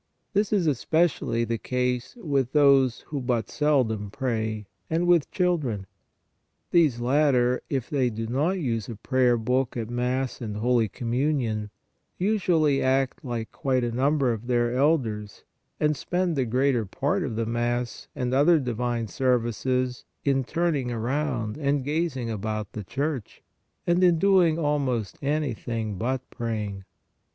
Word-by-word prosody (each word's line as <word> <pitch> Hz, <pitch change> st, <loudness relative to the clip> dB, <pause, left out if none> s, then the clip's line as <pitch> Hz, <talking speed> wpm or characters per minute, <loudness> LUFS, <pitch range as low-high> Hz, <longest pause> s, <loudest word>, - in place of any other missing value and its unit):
This 205 Hz, 0 st, +1 dB
is 200 Hz, -5 st, +2 dB
especially 145 Hz, -4 st, +1 dB
the 115 Hz, -1 st, -2 dB
case 125 Hz, -, -2 dB
with 140 Hz, -, -1 dB
those 140 Hz, -4 st, +4 dB
who 145 Hz, -3 st, -5 dB
but 120 Hz, -3 st, -1 dB
seldom 125 Hz, -9 st, +1 dB
pray 110 Hz, -3 st, -2 dB, 0.2 s
and 165 Hz, +2 st, +1 dB
with 175 Hz, -4 st, +3 dB
children. 155 Hz, -, 0 dB, 0.9 s
These 155 Hz, -9 st, +4 dB
latter, 125 Hz, -1 st, +2 dB
if 130 Hz, -4 st, -1 dB
they 135 Hz, -4 st, +1 dB
do 115 Hz, 0 st, -4 dB
not 140 Hz, +10 st, +1 dB
use 115 Hz, -, -2 dB
a 115 Hz, -, -5 dB
prayer 125 Hz, +2 st, +2 dB
book 125 Hz, +3 st, 0 dB
at 115 Hz, 0 st, -4 dB
Mass 125 Hz, +2 st, -1 dB
and 105 Hz, -3 st, -4 dB
holy 120 Hz, 0 st, +2 dB
Communion, 120 Hz, -2 st, -1 dB, 0.5 s
usually 175 Hz, -8 st, +2 dB
act 130 Hz, 0 st, +1 dB
like 120 Hz, -4 st, -4 dB
quite 130 Hz, -2 st, 0 dB
a 120 Hz, -, -1 dB
number 135 Hz, +1 st, +2 dB
of 115 Hz, +1 st, -7 dB
their 120 Hz, -1 st, +1 dB
elders 125 Hz, -8 st, 0 dB, 0.4 s
and 150 Hz, 0 st, +2 dB
spend 180 Hz, +3 st, -1 dB
the 135 Hz, -3 st, +1 dB
greater 125 Hz, 0 st, +2 dB
part 135 Hz, +8 st, -1 dB
of 115 Hz, -, -3 dB
the 115 Hz, 0 st, -1 dB
Mass 120 Hz, +1 st, -2 dB
and 125 Hz, 0 st, -2 dB
other 150 Hz, +5 st, +5 dB
divine 120 Hz, -2 st, -2 dB
services 125 Hz, +1 st, 0 dB, 0.2 s
in 135 Hz, -1 st, +2 dB
turning 160 Hz, -3 st, 0 dB
around 120 Hz, -1 st, -2 dB
and 140 Hz, -2 st, +1 dB
gazing 145 Hz, -4 st, -1 dB
about 110 Hz, -1 st, -3 dB
the 105 Hz, -, -6 dB
church, 140 Hz, +2 st, -4 dB, 0.4 s
and 175 Hz, +1 st, +2 dB
in 175 Hz, -2 st, +5 dB
doing 180 Hz, -3 st, +4 dB
almost 140 Hz, -8 st, -1 dB
anything 120 Hz, -8 st, -2 dB
but 130 Hz, +3 st, -2 dB
praying. 105 Hz, -5 st, -4 dB
125 Hz, 145 wpm, -26 LUFS, 115-145 Hz, 0.9 s, other